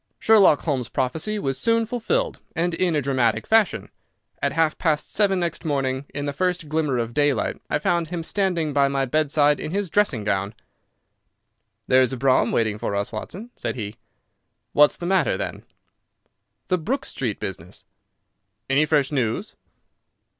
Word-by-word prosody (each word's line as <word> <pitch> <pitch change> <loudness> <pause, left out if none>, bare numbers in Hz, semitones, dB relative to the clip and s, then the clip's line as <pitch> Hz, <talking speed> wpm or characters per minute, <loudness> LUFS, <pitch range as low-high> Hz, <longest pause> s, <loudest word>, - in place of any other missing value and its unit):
Sherlock 205 -9 +5
Holmes's 130 -7 -2
prophecy 155 +11 -1
was 135 -8 -2
soon 230 +6 +2
fulfilled, 355 - -1 0.2
and 170 +1 0
in 175 -1 +1
a 145 - 0
dramatic 130 -4 +1
fashion. 220 -4 +2 0.5
At - - +1
half 160 0 +1
past 155 -3 0
seven 200 -3 +2
next 170 -2 -3
morning, 135 -3 -1
in 145 0 -4
the 145 - -2
first 180 0 -1
glimmer 150 -3 0
of 120 0 -2
daylight, 145 -6 0
I - - +1
found 170 -1 0
him 170 0 -4
standing 170 -4 0
by 140 -1 +4
my 135 0 0
bedside 145 +1 +2
in 155 - -4
his 195 0 -2
dressing 170 - +1
gown. 100 +1 -1 1.3
"There's 130 0 +4
a - - -3
brougham 130 +1 +3
waiting 110 -2 0
for 105 -3 -2
us, 100 0 -2
Watson," 195 - -7
said - - -4
he. 105 -3 -6 0.8
"What's 150 0 +5
the 175 - -6
matter, 190 +1 +2
then?" - - -5 1.0
"The 185 -1 +2
Brook 260 - -2
Street 115 -6 -3
business." 90 -2 -7 0.9
"Any 145 +3 +3
fresh 145 -2 +2
news?" 120 -6 -1
150 Hz, 160 wpm, -23 LUFS, 130-180 Hz, 1.3 s, Sherlock